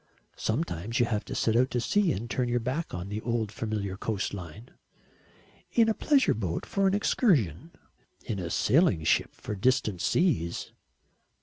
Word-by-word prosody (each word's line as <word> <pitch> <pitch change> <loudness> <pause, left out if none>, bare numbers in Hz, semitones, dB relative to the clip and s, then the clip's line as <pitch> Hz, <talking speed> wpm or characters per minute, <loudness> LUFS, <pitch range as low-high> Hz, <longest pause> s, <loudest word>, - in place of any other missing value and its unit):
"Sometimes 110 - -2
you 120 - +4
have 110 -3 -1
to - - -6
set 110 - +1
out 130 +2 +4
to 125 - -1
sea 200 - +2
and 110 +5 -3
turn 125 +1 -1
your 120 0 +1
back 130 +8 -3
on 90 +2 -5
the 105 +1 -4
old 115 -3 -1
familiar 105 -4 -3
coastline." 100 0 -4 1.0
"In 230 -2 +5
a - - +3
pleasure 275 +3 +3
boat 95 -6 -3
for 195 -1 +1
an 190 - +2
excursion." 160 - +1 0.6
"In 105 - -3
a 85 -2 -4
sailing 130 - +3
ship - - +1
for - - -6
distant 105 -3 +1
seas." 120 - 0
115 Hz, 165 wpm, -28 LUFS, 100-140 Hz, 1.0 s, In